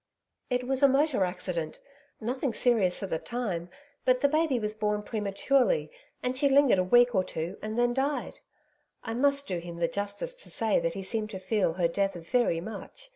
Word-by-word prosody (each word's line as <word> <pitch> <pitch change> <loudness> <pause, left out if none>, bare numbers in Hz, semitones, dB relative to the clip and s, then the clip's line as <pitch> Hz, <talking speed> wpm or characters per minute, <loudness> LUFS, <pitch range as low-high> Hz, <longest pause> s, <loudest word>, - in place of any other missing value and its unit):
'It 250 -1 0
was 265 +1 0
a 280 - +8
motor 275 -4 +2
accident 180 -3 -3 0.4
nothing 250 +2 -2
serious 210 -7 +2
at 195 - -5
the 160 - 0
time, 200 -9 -3 0.3
but 255 0 +3
the 285 - +5
baby 305 -2 +2
was 210 -1 -1
born 210 -1 -1
prematurely, 230 - +1 0.3
and 250 +1 -1
she 280 +2 +3
lingered 275 -7 +5
a - - +3
week 240 +6 +5
or 190 -3 +3
two, 170 +2 -4
and 215 +1 -4
then 240 0 +3
died. 275 +3 -2 0.6
I 225 - -4
must 280 +3 +1
do 180 -2 -2
him 170 0 -8
the 170 0 +1
justice 205 - -3
to - - -9
say 220 -2 +1
that 165 0 -2
he 195 - -4
seemed 215 +2 -1
to 190 -3 -6
feel 190 -2 +1
her 175 -1 +1
death 195 +3 -1
very 175 +1 +1
much. 225 - -8
220 Hz, 195 wpm, -28 LUFS, 185-260 Hz, 0.6 s, a